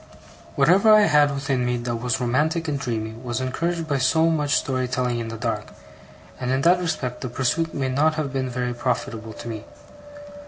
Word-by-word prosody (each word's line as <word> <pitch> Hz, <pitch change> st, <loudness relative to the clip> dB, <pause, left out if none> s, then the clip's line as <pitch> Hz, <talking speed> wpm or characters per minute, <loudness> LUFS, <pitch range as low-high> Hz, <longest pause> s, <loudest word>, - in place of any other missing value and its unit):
Whatever 185 Hz, +10 st, +5 dB
I 215 Hz, -, +6 dB
had 150 Hz, -6 st, +4 dB
within 135 Hz, -2 st, -1 dB
me 125 Hz, 0 st, 0 dB
that 120 Hz, 0 st, -3 dB
was 120 Hz, 0 st, -1 dB
romantic 155 Hz, +7 st, 0 dB
and 145 Hz, -2 st, -1 dB
dreamy, 115 Hz, -5 st, -3 dB
was 120 Hz, 0 st, -4 dB
encouraged 165 Hz, +6 st, -2 dB
by 140 Hz, -3 st, 0 dB
so 160 Hz, +6 st, +3 dB
much 150 Hz, -2 st, +1 dB
story 130 Hz, -2 st, 0 dB
telling 125 Hz, -2 st, -1 dB
in 115 Hz, -, -4 dB
the 115 Hz, 0 st, -6 dB
dark; -, -, -3 dB, 0.7 s
and 125 Hz, -, -3 dB
in 130 Hz, +1 st, +1 dB
that 175 Hz, +4 st, +4 dB
respect 140 Hz, -8 st, -3 dB
the 125 Hz, -, -4 dB
pursuit 145 Hz, +7 st, 0 dB
may 135 Hz, -2 st, -1 dB
not 150 Hz, +4 st, +2 dB
have 150 Hz, -4 st, -3 dB
been 130 Hz, -1 st, -1 dB
very 125 Hz, 0 st, -2 dB
profitable 115 Hz, -2 st, -3 dB
to -, -, -9 dB
me. 110 Hz, -3 st, -5 dB
130 Hz, 195 wpm, -23 LUFS, 125-155 Hz, 0.7 s, I